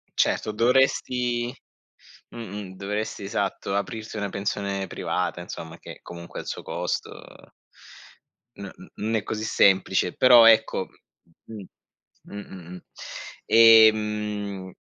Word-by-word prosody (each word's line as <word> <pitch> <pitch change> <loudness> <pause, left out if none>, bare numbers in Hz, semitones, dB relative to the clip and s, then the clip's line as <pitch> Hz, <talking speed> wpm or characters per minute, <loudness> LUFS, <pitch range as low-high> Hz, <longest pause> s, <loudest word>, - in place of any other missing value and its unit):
Certo, 110 - +1
dovresti 120 +1 +1 0.8
mh-mh, 105 -4 -8
dovresti, 105 +1 -4
esatto, 100 -1 -3
aprirti 110 +2 -4
una 100 -1 -2
pensione 100 0 -3
privata, 90 -1 -3
insomma 85 -1 -9
che - - -12
comunque 85 0 -9
ha - - -6
il - - -12
suo - - -5
costo. - - -4 1.5
N 100 - -7
n - - -15
non 110 +2 -2
è 105 - -1
così 110 0 -4
semplice. 95 -3 +2
Però 120 -3 +7
ecco 110 -4 +4 0.6
m 110 -3 -9 0.6
mh-mh, - - -12
mh, 100 -1 -9
mh, 90 -1 -12
mh. 90 - -10 0.6
Ehm, 105 -4 +4
105 Hz, 120 wpm, -24 LUFS, 95-110 Hz, 1.5 s, Però